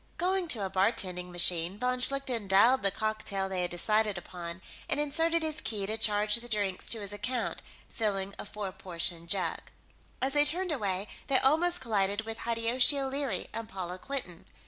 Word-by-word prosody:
Going 370 0 0
to 220 -10 +1
a - - -3
bartending 185 -2 +1
machine, 175 +1 +1
von 250 +2 0
Schlichten 255 -5 +2
dialed 225 +7 +5
the 195 - +3
cocktail 210 -1 -2
they 190 -1 -2
had 175 - -1
decided 210 +3 +1
upon 175 +1 -8 0.3
and - - +2
inserted 325 +3 +1
his 310 -1 -2
key 210 -3 -2
to 215 +2 -2
charge 210 -1 +2
the 240 +1 -9
drinks 200 -4 -1
to 225 - -1
his 200 0 -6
account, 245 +3 -3 0.3
filling 200 -3 -2
a - - -4
four 205 -2 -5
portion 170 -2 -5
jug. 185 +1 +1 0.6
As 265 +1 +1
they 290 0 +5
turned 355 +4 0
away, 200 -7 -1 0.2
they 275 - +4
almost 340 +7 +3
collided 205 -3 0
with 225 +1 -6
Hideyoshi 235 +4 +3
O'Leary 270 -7 -2
and 225 -1 -5
Paula 185 -1 -6
Quinton. 245 -12 -5
215 Hz, 175 wpm, -30 LUFS, 190-260 Hz, 0.6 s, dialed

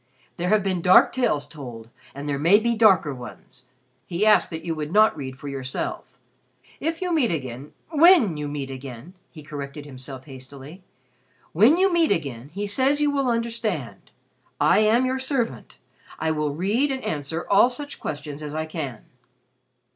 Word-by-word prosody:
There 175 +1 -1
have 215 -1 +3
been 185 -3 -1
dark 185 +10 +6
tales 235 - 0
told 120 -7 -9 0.3
and 140 +1 -6
there 140 -1 -1
may 170 +7 +6
be 235 +2 0
darker 190 -10 +4
ones. 125 0 -12 0.4
He 180 +4 0
asked 215 -1 +5
that 160 0 -7
you 165 - -1
would 155 -1 -5
not 215 +3 +5
read 130 -3 -7
for 145 - -9
yourself. 135 -2 -5 0.6
If 325 +4 -2
you 360 -1 -1
meet 280 -8 +2
again 130 -2 -5 0.2
when 315 - +6
you 150 -1 -4
meet 140 -2 -5
again" 130 +4 -9 0.2
he 155 -3 -12
corrected 145 0 -7
himself 130 -1 -7
hastily 135 +5 -10 0.7
"when 225 - +5
you 380 0 +3
meet 335 -2 +3
again, 140 -5 -2
he 200 +5 -4
says 265 +8 +2
you 295 -1 +2
will 275 -2 0
understand. 230 - -3 0.5
I - - +4
am 220 +4 +3
your 260 +1 -1
servant. 260 -3 -3 0.4
I 160 - -1
will 150 -1 -1
read 215 - +1
and 265 -1 -4
answer 155 +2 -3
all 205 +5 +5
such 285 +3 -6
questions 150 0 -6
as 150 0 -6
I 155 0 -2
can." 150 -8 -6
165 Hz, 170 wpm, -24 LUFS, 140-235 Hz, 0.7 s, dark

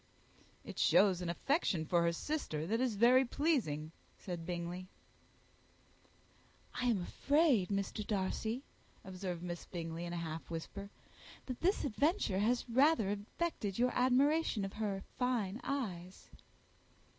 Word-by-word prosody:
"It - - -7
shows 190 -3 +5
an 175 - -3
affection 180 - 0
for 170 +2 +2
her 170 0 +3
sister 170 - -3
that 225 +7 0
is 250 -4 +1
very 245 +5 +6
pleasing," 235 - 0 0.3
said 175 -3 -6
Bingley. 175 +1 -4 1.9
"I 250 - -2
am 210 -7 +2
afraid, 280 - +2
Mr. 200 +1 -2
Darcy," 220 +5 -1 0.4
observed 185 -2 -5
Miss 175 -1 -5
Bingley, 165 -1 -5
in 175 - -5
a - - -2
half 165 -1 -5
whisper, 185 +4 -6 0.6
"that 255 -2 -6
this 375 +4 +2
adventure 285 - +1
has 240 +5 +1
rather 255 -3 +4
affected 205 - -3
your 250 +1 +3
admiration 260 -2 +3
of 195 - -6
her 205 -3 -2 0.2
fine 240 -4 0
eyes." 190 -10 -4
200 Hz, 130 wpm, -35 LUFS, 175-255 Hz, 1.9 s, very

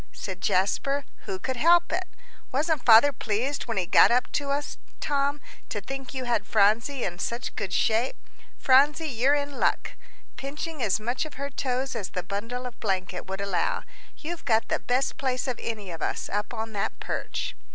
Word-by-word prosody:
said 190 -3 -6
Jasper; 275 +9 +1 0.2
"who 190 - -3
could 260 +7 -3
help 345 +4 +5
it? 365 +2 -1 0.4
Wasn't 295 +1 +1
father 235 +5 +8
pleased 250 +6 -2
when 230 - -2
he 185 - +1
got - - +7
up 245 +1 +2
to 285 -1 -1
us, 285 +1 -2 0.2
Tom, 285 0 0 0.3
to 210 - -2
think 270 +6 -6
you 260 -2 -4
had 240 -1 0
Phronsie 225 +6 +3
in 175 -1 -3
such 235 +6 -3
good 200 -4 -3
shape? 225 +3 +2 0.4
Phronsie, 290 +4 +4
you're 265 +3 +3
in 285 -1 -3
luck," - - +1 0.5
pinching 300 +2 -5
as 210 -2 +2
much 240 +4 -1
of 310 - -8
her 280 +1 -4
toes 260 -1 -2
as 205 -5 -3
the 180 - -4
bundle 230 +7 -4
of 245 - -7
blanket 185 -3 -2
would 190 +1 -4
allow; 200 -3 0 0.3
"you've 335 +2 -6
got 225 -1 +2
the - - +1
best 255 +2 0
place 255 -1 -1
of 255 - -2
any 210 -5 -4
of 165 -1 -7
us, - - -2
up 205 +1 -2
on 225 -1 -4
that 200 - -2
perch." - - -3
250 Hz, 185 wpm, -27 LUFS, 210-280 Hz, 0.5 s, father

